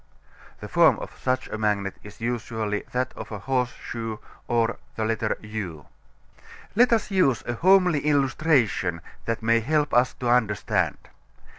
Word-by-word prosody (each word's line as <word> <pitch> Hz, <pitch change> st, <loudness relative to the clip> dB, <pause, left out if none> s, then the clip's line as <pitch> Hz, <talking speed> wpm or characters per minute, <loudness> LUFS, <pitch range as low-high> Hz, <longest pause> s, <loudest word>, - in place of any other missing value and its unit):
(The -, -, -6 dB
form -, -, +5 dB
of -, -, -8 dB
such 130 Hz, 0 st, 0 dB
a 110 Hz, -, -5 dB
magnet 100 Hz, -3 st, 0 dB
is 105 Hz, 0 st, -13 dB
usually 110 Hz, -3 st, -2 dB
that 125 Hz, +1 st, -1 dB
of -, -, -8 dB
a 105 Hz, -, -4 dB
horse 125 Hz, +4 st, 0 dB
shoe, 115 Hz, -2 st, -6 dB, 0.3 s
or 115 Hz, -1 st, +1 dB, 0.2 s
U.) 110 Hz, -6 st, -3 dB, 0.9 s
Let 240 Hz, +3 st, +5 dB
us 225 Hz, -2 st, +1 dB
use 180 Hz, -10 st, +2 dB
a 120 Hz, -, -2 dB
homely 180 Hz, +2 st, +4 dB
illustration 135 Hz, -, +2 dB, 0.2 s
that 115 Hz, 0 st, -2 dB
may 115 Hz, +1 st, +4 dB
help 150 Hz, +5 st, 0 dB
us 125 Hz, +1 st, +3 dB
to 125 Hz, -, -4 dB
understand. 115 Hz, -4 st, +1 dB
115 Hz, 140 wpm, -25 LUFS, 110-135 Hz, 0.9 s, form